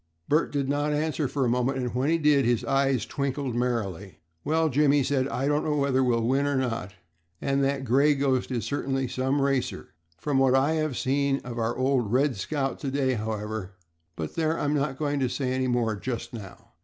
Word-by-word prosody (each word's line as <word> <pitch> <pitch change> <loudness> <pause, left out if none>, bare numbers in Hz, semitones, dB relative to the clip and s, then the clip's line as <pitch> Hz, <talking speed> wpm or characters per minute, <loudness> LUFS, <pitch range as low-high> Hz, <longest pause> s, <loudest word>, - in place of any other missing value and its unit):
Bert 155 +3 +2
did 140 -2 -1
not 145 +1 0
answer 155 -1 0
for 135 0 -1
a - - +2
moment, 125 +3 +1
and 125 -2 -2
when 130 +4 0
he 165 - +3
did 150 -3 +4
his 120 -2 +1
eyes 135 -4 +1
twinkled 140 -2 -2
merrily. 100 -8 -2 0.3
"Well, 160 +2 +2
Jim," 145 0 +3
he 145 -2 +3
said, 130 0 +1
"I 135 0 -2
don't 150 +1 +1
know 150 - 0
whether 140 -2 +2
we'll 120 -2 +1
win 135 +3 +2
or 145 - 0
not 115 -7 -2 0.4
and 140 0 0
that 135 0 0
'Gray 140 +5 +4
Ghost' 135 -2 0
is 120 -3 -2
certainly 135 -2 -1
some 130 +3 0
racer. 135 -2 -1 0.3
From 140 +6 0
what 135 -1 +4
I 135 +3 +3
have 155 -4 -1
seen 140 +1 +1
of 120 -1 -6
our 115 +1 -1
old 130 -4 +1
'Red 135 +2 +2
Scout' 135 +7 -2
to 140 - -3
day, 135 -1 +1
however, 110 -3 -4 0.4
but 80 -2 -5
there, 160 0 0
I'm 145 0 0
not 140 -2 -1
going 145 -1 -1
to 130 -2 +1
say 130 0 -2
any 130 0 0
more 120 -3 +1
just 120 +3 -5
now. 100 -5 -10
135 Hz, 210 wpm, -26 LUFS, 125-145 Hz, 0.4 s, did